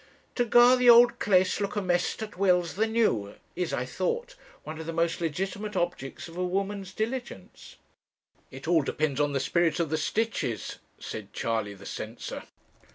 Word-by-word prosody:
To 245 - +1
gar 240 +2 +6
the 250 -1 +5
auld 240 0 +7
claes 190 0 +2
look 200 - -2
amaist 180 +1 0
as - - -18
weel's 180 -3 +2
the 220 +3 +1
new 215 - 0 0.2
is, 180 0 -2
I - - -1
thought, 485 +1 -2 0.3
one 155 0 -7
of 160 - -7
the 165 - -3
most 165 +1 0
legitimate 195 +6 -3
objects 175 -7 -3
of 165 - -12
a 180 - -1
woman's 195 +1 -2
diligence.' 235 - -6 0.7
'It 135 +3 -10
all 170 -2 +4
depends 145 0 -1
on 145 -1 +1
the 135 - +1
spirit 170 +3 +1
of 165 -3 -1
the 155 - 0
stitches,' 210 - -2 0.2
said 105 -2 -8
Charley 110 -3 -2
the 100 - -14
censor. 110 +2 -6
180 Hz, 170 wpm, -27 LUFS, 155-215 Hz, 0.7 s, auld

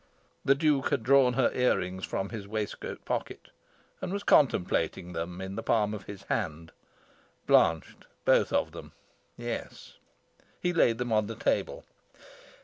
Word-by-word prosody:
The 135 - +4
Duke 145 -2 +2
had 140 -6 0
drawn 130 0 +5
her 130 0 +2
ear 125 0 +3
rings 95 +1 -4
from 95 0 -3
his 105 -4 -7
waistcoat 105 0 -5
pocket, - - -4 0.5
and - - -3
was 200 +1 -3
contemplating 90 - +2
them 85 +2 -4
in 95 0 -5
the 115 - -3
palm 105 -2 +1
of 100 -3 -7
his 100 -1 -9
hand. 80 -6 -3 0.7
Blanched, 80 -1 +2 0.2
both - - +4
of - - +1
them, - - -10 0.4
yes. - - -6 0.6
He 175 - 0
laid 120 -9 +3
them 120 -1 -2
on 110 -1 +2
the 115 - -5
table. - - -1
110 Hz, 150 wpm, -29 LUFS, 95-130 Hz, 0.7 s, drawn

